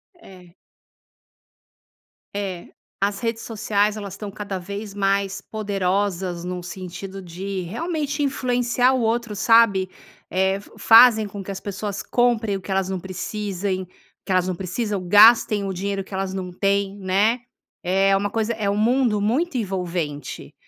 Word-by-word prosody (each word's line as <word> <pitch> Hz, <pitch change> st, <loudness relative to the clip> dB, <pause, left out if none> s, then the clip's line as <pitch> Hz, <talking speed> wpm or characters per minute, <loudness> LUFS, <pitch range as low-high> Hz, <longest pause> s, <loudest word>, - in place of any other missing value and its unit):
É. 180 Hz, -, -16 dB, 1.8 s
É. 190 Hz, -4 st, -4 dB, 0.3 s
As 200 Hz, 0 st, 0 dB
redes 230 Hz, -1 st, -2 dB
sociais 210 Hz, -1 st, 0 dB
elas 200 Hz, -3 st, -6 dB
estão 205 Hz, +1 st, -6 dB
cada 200 Hz, -1 st, -5 dB
vez 200 Hz, +3 st, -6 dB
mais 195 Hz, 0 st, 0 dB
poderosas 195 Hz, -4 st, -2 dB
num 180 Hz, 0 st, -4 dB
sentido 185 Hz, +2 st, -7 dB
de 185 Hz, +2 st, -5 dB
realmente 295 Hz, -, -3 dB
influenciar 250 Hz, -2 st, +1 dB
o 255 Hz, -, +1 dB
outro, 225 Hz, -1 st, 0 dB
sabe? 215 Hz, -3 st, +4 dB, 0.4 s
Eh, 190 Hz, +1 st, +1 dB
fa 200 Hz, -, -16 dB
fazem 225 Hz, -2 st, +7 dB
com 200 Hz, 0 st, -7 dB
que 195 Hz, -, -11 dB
as 195 Hz, -, -5 dB
pessoas 200 Hz, 0 st, -4 dB
comprem 235 Hz, -4 st, +1 dB
o -, -, -10 dB
que 190 Hz, -, -13 dB
elas 190 Hz, -1 st, 0 dB
não 190 Hz, -1 st, -2 dB
precisem, 190 Hz, 0 st, -3 dB, 0.4 s
que 195 Hz, -, -5 dB
elas 185 Hz, 0 st, +2 dB
não 185 Hz, -, -1 dB
precisam, 195 Hz, +2 st, -3 dB
gastem 210 Hz, +1 st, +6 dB
o 190 Hz, -, -2 dB
dinheiro 195 Hz, +1 st, -3 dB
que 195 Hz, -, -14 dB
elas 190 Hz, 0 st, -2 dB
não 185 Hz, -1 st, -4 dB
têm, 200 Hz, +1 st, 0 dB
né? 200 Hz, +5 st, +2 dB, 0.4 s
É 195 Hz, +2 st, +3 dB
uma 200 Hz, +1 st, 0 dB
coisa, 225 Hz, +2 st, -1 dB
é 215 Hz, -3 st, -1 dB
um 200 Hz, -, 0 dB
mundo 235 Hz, 0 st, +2 dB
muito 260 Hz, +9 st, 0 dB
envolvente. 175 Hz, -8 st, -4 dB
200 Hz, 150 wpm, -23 LUFS, 190-220 Hz, 1.8 s, fazem